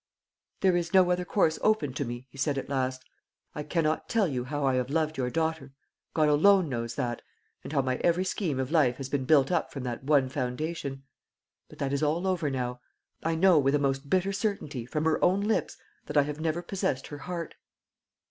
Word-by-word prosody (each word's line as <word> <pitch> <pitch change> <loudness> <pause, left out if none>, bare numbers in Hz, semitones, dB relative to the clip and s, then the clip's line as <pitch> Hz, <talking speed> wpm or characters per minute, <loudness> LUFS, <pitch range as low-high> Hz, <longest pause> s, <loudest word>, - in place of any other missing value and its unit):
"There 185 -2 +4
is 170 0 -1
no 185 -1 +6
other 180 0 0
course 165 -4 +1
open 215 -12 +2
to 140 - -2
me," 120 +1 -6
he 140 - -14
said 140 0 0
at 135 - -4
last. 130 -1 -1 0.5
"I 150 - -4
cannot 155 +1 -1
tell 220 -4 +2
you 125 -5 -3
how 145 +1 -2
I 135 - +3
have 125 0 0
loved 155 +1 0
your 125 -3 -1
daughter 160 -2 -2 0.4
God 155 -1 +4
alone 185 +5 +5
knows 115 -3 -3
that 120 -3 -2 0.4
and - - -7
how 140 -3 +2
my 130 -1 0
every 175 +2 +1
scheme 170 -8 -1
of 130 +2 -2
life 135 -7 +3
has 135 -1 -6
been 135 -2 -1
built 140 +1 +4
up 175 - 0
from 135 - -6
that 125 0 -4
one 140 -2 +3
foundation. 135 +2 -3 0.7
But - - -14
that 140 0 -2
is 140 - 0
all 155 +4 +1
over 180 -5 0
now. 125 -2 -3 0.4
I 165 0 0
know, 175 -1 +5
with 135 0 +2
a - - +4
most 140 0 -1
bitter 190 +3 +1
certainty, 190 - -3
from 150 +4 -2
her 160 -1 +1
own 185 +3 +4
lips, 215 +2 0 0.3
that 150 - -2
I 145 - +6
have 150 +1 -5
never 160 +2 -1
possessed 175 -8 -2
her 145 - -7
heart." 170 0 -5
150 Hz, 215 wpm, -28 LUFS, 135-170 Hz, 0.7 s, no